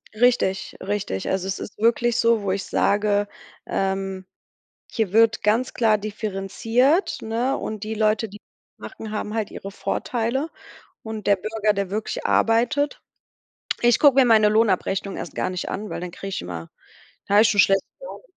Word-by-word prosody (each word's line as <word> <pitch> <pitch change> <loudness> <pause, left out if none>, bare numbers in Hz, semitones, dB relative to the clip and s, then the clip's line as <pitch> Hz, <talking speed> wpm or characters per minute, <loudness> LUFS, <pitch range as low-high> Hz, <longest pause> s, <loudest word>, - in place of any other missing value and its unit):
Richtig, 220 -5 +1
richtig. 195 - -3
Also, 190 0 -1
es 195 - -3
ist - - -8
wirklich 235 +1 +2
so, 230 -2 +3
wo 195 -2 -1
ich 195 +1 -1
sage, 205 0 +1 0.4
ähm: 195 -1 -2 0.7
„Hier 215 -5 -1
wird 225 0 +4
ganz 220 +5 +1
klar 220 -3 +3
differenziert“, 215 - 0
ne? 235 +5 -1
Und 215 -1 -5
die 220 +1 -4
Leute, 220 +1 +1
die 210 +1 -12 0.4
machen, 385 - -9
die 215 - -6
haben 210 0 -4
halt 220 -2 -2
ihre 195 - -7
Vorteile 245 +8 -2 0.5
und 220 -2 -6
der 200 - +5
Bürger, 215 +1 0
der 200 -2 -2
wirklich 215 +2 -4
arbeitet 265 +6 +2 0.8
ich 240 -1 +4
guck 285 -3 +6
mir 270 - +6
meine 220 -3 +5
Lohnabrechnung 200 -2 +1
erst - - -7
gar 185 - -1
nicht 180 -1 -4
an, 210 +1 -4
weil - - -5
dann 180 - -5
kriege 195 +2 -7
ich - - -4
immer 85 -2 -7 0.6
dann 205 - +3
hab 215 - +8
ich 220 - +4
schon 205 -1 +1
schlechte 195 0 +3 0.2
Laune. - - -9
215 Hz, 175 wpm, -23 LUFS, 195-230 Hz, 0.8 s, hab